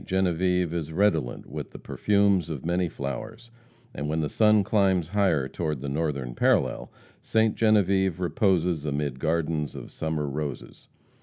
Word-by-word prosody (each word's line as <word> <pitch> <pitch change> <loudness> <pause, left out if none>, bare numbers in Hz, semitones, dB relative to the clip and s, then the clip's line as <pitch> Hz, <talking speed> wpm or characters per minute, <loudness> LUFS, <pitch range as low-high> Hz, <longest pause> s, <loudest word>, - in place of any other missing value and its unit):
Genevieve 90 -2 +1
is 80 -2 -3
redolent 80 -8 0
with - - -7
the - - -11
perfumes 100 -5 +1
of 75 -4 -5
many 90 0 0
flowers, 110 +11 -6 0.4
and 75 - -4
when 80 +1 0
the 75 - -1
sun 105 -2 +4
climbs 95 -5 +2
higher 90 -9 +2
toward 75 0 -3
the 70 +2 -5
northern 70 -4 -2
parallel, - - +1 0.3
Ste. 110 -1 +2
Genevieve 95 -4 +2
reposes 90 - +1
amid 70 -3 -2
gardens 80 -1 -1
of - - -9
summer 80 -2 -2
roses. 70 0 -6
85 Hz, 145 wpm, -26 LUFS, 75-95 Hz, 0.4 s, sun